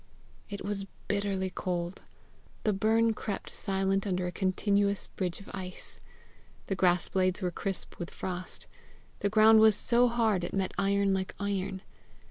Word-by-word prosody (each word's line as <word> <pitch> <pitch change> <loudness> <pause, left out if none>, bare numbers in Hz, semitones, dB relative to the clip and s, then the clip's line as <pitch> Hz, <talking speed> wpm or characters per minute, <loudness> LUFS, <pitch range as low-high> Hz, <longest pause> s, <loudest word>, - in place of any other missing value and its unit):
It 200 -1 -6
was 200 -1 -1 0.2
bitterly 200 -2 0
cold. 175 0 -3 0.6
The 215 - +2
burn 225 +3 +3
crept 210 -2 -4
silent 195 +1 0
under 185 -1 0
a 180 - -2
continuous 200 +2 +1
bridge 180 -3 -3
of 200 - -11
ice. 185 -2 -7 0.7
The 195 - -1
grass 180 -2 +3
blades 185 +1 +1
were 180 - 0
crisp 195 +2 -4
with 175 - -4
frost. 180 0 -5 0.5
The 200 - +1
ground 220 +1 +7
was 220 -1 +7
so 245 +2 +3
hard 225 -6 +2
it 175 - -3
met 190 -1 0
iron 200 0 +2
like 190 0 -2
iron. 195 -1 -2
195 Hz, 150 wpm, -30 LUFS, 185-205 Hz, 0.7 s, ground